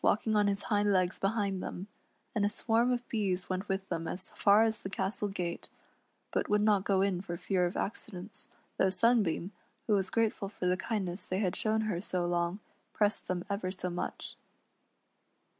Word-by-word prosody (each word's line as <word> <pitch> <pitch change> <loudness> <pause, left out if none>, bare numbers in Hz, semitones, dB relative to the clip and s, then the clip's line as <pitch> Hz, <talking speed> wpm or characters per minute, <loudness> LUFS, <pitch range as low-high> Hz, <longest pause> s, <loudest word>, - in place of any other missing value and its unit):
85 - - +5
walking 215 +1 -1
on 210 -1 +4
his 200 0 0
hind 205 -1 +2
legs 185 -2 +2
behind 195 -2 0
them, 185 - -5 0.5
and 210 - +1
a 205 - +3
swarm 230 +3 +2
of 245 0 -1
bees 190 -5 -1
went 185 +3 -2
with 195 0 -1
them 165 0 -2
as 185 +3 -2
far 205 +2 +5
as 220 -1 +1
the 190 - -5
castle 195 +2 -1
gate, 175 -3 -4 0.6
but - - 0
would 210 0 +3
not 205 -3 +4
go 195 -1 +3
in 190 -3 +1
for 175 -3 -5
fear 180 0 +1
of 175 - -5
accidents, 195 -2 -4 0.3
though 190 - +4
Sunbeam, 200 -3 +2 0.3
who 215 - +2
was 190 -2 +2
grateful 220 -3 0
for 195 - -5
the 180 0 +3
kindness 190 -2 -2
they 185 - -1
had 190 -3 0
shown 220 0 +1
her 210 -6 -1
so 180 -2 -1
long, 175 +1 0 0.4
pressed 210 0 +1
them 180 -1 -2
ever 200 -2 -2
so 185 -1 -3
much. 175 - -4
195 Hz, 190 wpm, -32 LUFS, 185-210 Hz, 0.6 s, 85